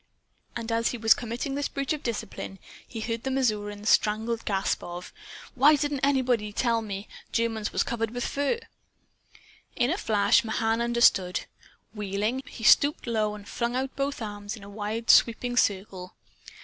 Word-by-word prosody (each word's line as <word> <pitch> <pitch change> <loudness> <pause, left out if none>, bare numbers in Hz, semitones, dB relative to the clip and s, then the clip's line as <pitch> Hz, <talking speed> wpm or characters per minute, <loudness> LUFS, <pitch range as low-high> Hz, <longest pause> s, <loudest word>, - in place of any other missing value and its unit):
And 230 -1 -4
as 230 0 +1
he 245 - -4
was 225 -1 +6
committing 240 +3 -4
this 285 +1 -1
breach 275 +1 -2
of 300 - -5
discipline, 215 -4 -5 0.3
he 225 - -6
heard 230 +1 -3
the 265 - -3
Missourian's 210 -5 -1
strangled 220 +2 +1
gasp 195 -2 0
of: 175 +1 -8 0.4
"Why 285 +4 +6
didn't 290 -1 -1
anybody 255 -5 +2
ever 210 - -11
tell 230 -2 +2
me 205 -1 -6 0.2
Germans 225 -2 -1
was - - +1
covered 225 -1 -2
with 245 +2 -4
fur?" 285 +11 0 1.2
In 245 +4 +1
a 370 - -1
flash 205 0 +3
Mahan 225 +1 0
understood. 235 -6 +3 0.5
Wheeling, 210 +4 -2
he 235 - -10
stooped 285 +6 +5
low 215 -3 0
and 205 -1 -11
flung 235 0 -2
out 265 +1 -2
both 275 -3 -2
arms 205 0 -6
in 215 - -13
a 200 - -10
wide 215 +2 0
sweeping 245 +1 +3
circle. 190 -4 -1
230 Hz, 165 wpm, -27 LUFS, 210-250 Hz, 1.2 s, was